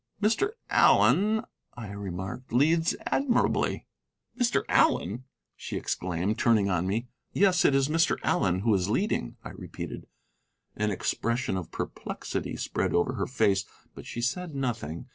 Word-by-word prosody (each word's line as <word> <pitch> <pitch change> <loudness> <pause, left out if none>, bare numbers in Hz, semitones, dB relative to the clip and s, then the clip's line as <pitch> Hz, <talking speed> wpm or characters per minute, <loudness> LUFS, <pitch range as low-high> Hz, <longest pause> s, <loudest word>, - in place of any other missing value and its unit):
"Mr. 230 - +1 0.2
Allen," 215 +3 +4 0.3
I 110 -4 -7
remarked, 95 +4 -6
"leads 160 +7 +3
admirably." 270 -3 +1 0.5
"Mr. 245 -2 +1
Allen!" 110 +9 +2 0.3
she - - -5
exclaimed, 90 +4 -2
turning 105 -4 +3
on 90 0 0
me. 110 +5 -1 0.3
"Yes, 185 -3 +4
it 140 - +5
is 135 0 +3
Mr. 165 +2 +2
Allen 90 -1 +1
who 110 +1 +2
is 95 -1 +1
leading," 120 - 0
I - - -7
repeated. - - -8 0.7
An 105 0 0
expression 115 +3 -1
of 95 -3 -4
perplexity - - -5
spread - - -1
over 85 +9 +2
her 105 -6 -2
face, 100 -6 +2 0.3
but - - -11
she 120 - -5
said 155 +6 -2
nothing. 110 - -3
115 Hz, 140 wpm, -28 LUFS, -, 0.7 s, it